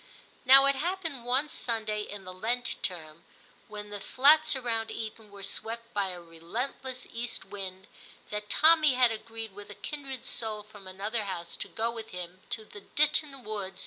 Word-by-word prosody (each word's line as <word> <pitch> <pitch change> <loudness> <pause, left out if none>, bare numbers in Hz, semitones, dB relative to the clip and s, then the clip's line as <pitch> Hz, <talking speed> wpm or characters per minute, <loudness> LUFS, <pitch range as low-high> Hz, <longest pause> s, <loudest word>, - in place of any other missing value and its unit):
Now 270 +2 +10
it 275 - +5
happened 325 -4 -3
one 260 +5 +3
Sunday 220 -6 -1
in 205 -1 -7
the 185 0 -8
Lent 235 +5 -2
term 165 -3 -3 0.4
when 210 0 -8
the 205 - -5
flats 305 +7 +5
around 230 -3 -1
Eton 220 -1 -6
were 200 -1 -11
swept 230 +3 -1
by 200 -2 +1
a 180 -1 -5
relentless 235 +10 -5
east 235 +1 -3
wind, 190 -2 -6 0.5
that 210 0 -4
Tommy 310 -2 +7
had 250 -2 +5
agreed 225 -1 -6
with 205 +1 -11
a 205 - -9
kindred 275 -4 -6
soul 215 -2 -2
from 205 -2 -13
another 205 +4 -2
house 170 -3 -4
to - - -2
go 230 +1 -1
with 225 -1 -7
him 180 +1 -6
to 220 - -2
the 210 - -11
Ditton - - -27
woods 300 0 +5 0.3
124 215 -2 -3
TIM 190 0 -9
CHAP. - - -11
220 Hz, 185 wpm, -29 LUFS, 200-255 Hz, 0.5 s, Now